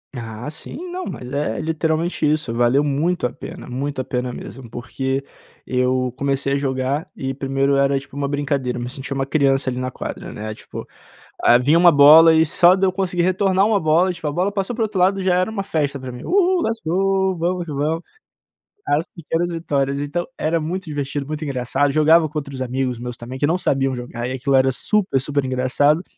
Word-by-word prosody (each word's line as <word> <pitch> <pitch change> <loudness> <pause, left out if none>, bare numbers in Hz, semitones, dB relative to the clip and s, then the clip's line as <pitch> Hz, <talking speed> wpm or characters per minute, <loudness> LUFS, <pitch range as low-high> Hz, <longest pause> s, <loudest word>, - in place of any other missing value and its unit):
Ah 115 +2 -6
sim, 155 +1 -9 0.2
não 365 0 -4
mas 125 0 -7
é 140 -6 -2
literalmente 160 +1 -1
isso. 150 -6 -1
Valeu 120 +4 +3
muito 150 +2 0
a - - -9
pena, - - -9
muito 135 +2 -3
a - - -4
pena 125 -1 -3
mesmo, 125 +1 -9
porque 130 +3 -3 0.4
eu 125 0 +1
comecei 140 0 0
a - - +2
jogar 135 +1 -1
e 135 0 -3
primeiro 135 +1 0
era 140 0 +2
tipo 135 0 -13
uma 140 -1 -1
brincadeira, 140 -3 -1
me 120 0 -4
senti 135 +2 -6
uma 135 -1 -2
criança 135 -2 +2
ali 125 - -4
na 130 0 -3
quadra, - - -7
né, 110 +1 -5
tipo, - - -9 0.6
ah, 120 - +6
vinha 140 +7 +3
uma 175 0 +7
bola 160 +2 +8
e 160 0 +5
só 175 +3 +5
de 195 0 +1
eu 185 - +2
conseguir 180 -2 -1
retornar 190 +1 +2
uma 215 -2 +2
bola, 165 +4 +3
tipo, 165 -3 -7
a - - -3
bola 185 +6 0
passou 200 +3 -2
pro 235 - -1
outro 210 -4 -1
lado 195 +2 +3
já 185 -1 +2
era 185 +4 +1
uma 210 -3 -3
festa 145 -7 -1
pra 130 -1 -7
mim 125 - -9
uhu 370 -1 +2
let's 225 -5 -2
go 190 +3 +1
vamos 175 +1 -1
que 160 - -7
vamos. 155 +4 -1 0.8
As 150 +3 +1
pequenas 170 0 -3
vitórias 140 -4 -1
então, 160 +5 -2
era 165 +2 0
muito 175 +4 -3
divertido, 145 -2 -3
muito 155 +2 -5
engraçado, 135 +1 0
jogava 155 +2 +5
com 155 +1 -7
outros 140 -3 -5
amigos 130 -1 -2
meus 125 0 -5
também, 125 +2 -8
que 145 - +2
não 170 +4 +1
sabiam 135 -6 0
jogar, 120 -1 -5
e 130 - -3
aquilo 135 +1 0
era 130 0 +4
super 190 - 0
super 140 0 -1
engraçado. 130 +5 +1
145 Hz, 210 wpm, -21 LUFS, 130-170 Hz, 0.8 s, bola